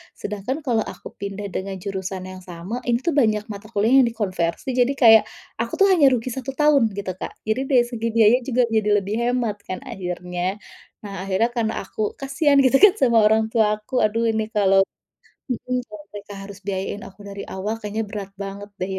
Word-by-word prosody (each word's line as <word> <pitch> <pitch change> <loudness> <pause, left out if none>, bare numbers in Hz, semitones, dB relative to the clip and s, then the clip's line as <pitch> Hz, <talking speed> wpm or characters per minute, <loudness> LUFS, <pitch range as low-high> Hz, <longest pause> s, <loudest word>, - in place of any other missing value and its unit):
Sedangkan 210 +9 -4
kalau 240 -5 +1
aku - - -9
pindah 200 0 -5
dengan 195 +1 -4
jurusan 190 0 -5
yang 185 0 -8
sama, 180 +6 -6
ini 240 +1 +1
tuh 340 - +1
banyak 215 -7 +2
mata 205 +1 -8
kuliah 230 +5 +3
yang 255 - +5
dikonversi. 200 -1 -2
Jadi 255 +3 +3
kayak, 225 -4 +7 0.3
aku 230 0 -2
tuh 395 0 +4
hanya 320 -7 +6
rugi 250 -1 +1
1 265 +2 -5
tahun 295 -6 +4
gitu, 200 -2 -3
Kak. - - -8
Jadi 255 +5 -1
dari 255 -4 +4
segi 235 -1 -4
biaya 230 +2 +6
juga 250 -1 +2
jadi 215 -1 +2
lebih 200 +3 -3
hemat 240 -4 -1
kan 185 - -5
akhirnya. 180 0 -4 0.5
Nah 195 -2 -6
akhirnya 195 +5 +1
karena 230 -2 -1
aku 215 -1 -3
kasihan 280 +2 +1
gitu 270 +1 +4
kan 410 -1 +7
sama 240 - +4
orang 220 0 +2
tua 215 -2 +3
aku. 215 +4 -3
Aduh 220 +2 +1
ini 220 -1 -1
kalau 195 -1 +5 0.7
mhm, 250 +1 -3
kalau 210 -1 -10
mereka 205 0 -9
harus 200 0 -10
biayain 195 +1 -3
aku 195 +2 -15
dari 200 0 -7
awal 205 +4 -3
kayaknya 210 +1 -3
berat 200 -2 -6
banget 200 +1 -7
deh. 185 - -1
215 Hz, 195 wpm, -22 LUFS, 195-245 Hz, 0.7 s, kayak